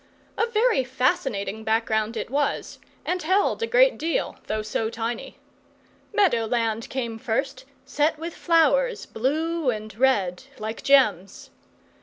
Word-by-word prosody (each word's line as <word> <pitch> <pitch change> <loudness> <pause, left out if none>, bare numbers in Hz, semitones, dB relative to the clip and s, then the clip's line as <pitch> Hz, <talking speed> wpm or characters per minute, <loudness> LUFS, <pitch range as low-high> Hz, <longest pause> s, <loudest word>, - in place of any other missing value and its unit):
A 460 - +1
very 455 - +2
fascinating 255 - -1
background 220 0 0
it - - -5
was, 285 +1 -1 0.3
and 360 0 -1
held 380 +7 +1
a 460 - 0
great - - +4
deal, 330 +1 -1
though 215 0 -2
so 220 +1 -2
tiny. 230 +1 -5 0.7
Meadow 365 - +2
land 230 -1 -1
came 235 -4 -4
first, 255 +3 -2 0.2
set 295 +3 +1
with 330 +2 -6
flowers, 475 +10 +2
blue 310 +5 -1
and 215 -3 -4
red, 220 -5 +1
like 220 +1 -5
gems. 215 -9 +2
260 Hz, 130 wpm, -24 LUFS, 220-330 Hz, 0.7 s, great